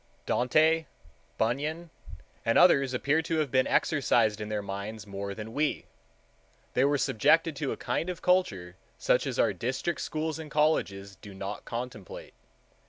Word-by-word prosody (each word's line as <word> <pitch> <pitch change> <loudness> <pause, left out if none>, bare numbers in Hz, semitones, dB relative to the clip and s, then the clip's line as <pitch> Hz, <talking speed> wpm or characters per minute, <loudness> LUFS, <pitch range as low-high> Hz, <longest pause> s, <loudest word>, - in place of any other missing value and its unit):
Dante, 155 +6 +2 0.5
Bunyan, 150 +9 -1 0.5
and 115 - +2
others 140 -7 +5
appear 140 +5 +1
to 160 0 -2
have 150 -5 0
been 130 -1 +3
exercised 115 -8 +2
in 105 - -5
their 105 -1 -2
minds 100 +2 -6
more 100 0 -5
than 110 +1 -7
we: 150 +2 -1 0.9
they 125 - +3
were 145 +1 +3
subjected 160 +6 +2
to 140 - -2
a - - -4
kind 170 - -2
of 180 -2 -4
culture 100 - +1 0.2
such - - +1
as - - -3
our - - +3
district 130 +7 -2
schools 155 0 -3
and 155 -1 -8
colleges 100 -11 0
do 100 -2 -12
not 100 +2 -6
contemplate. 120 -5 -7
130 Hz, 155 wpm, -28 LUFS, 105-155 Hz, 0.9 s, others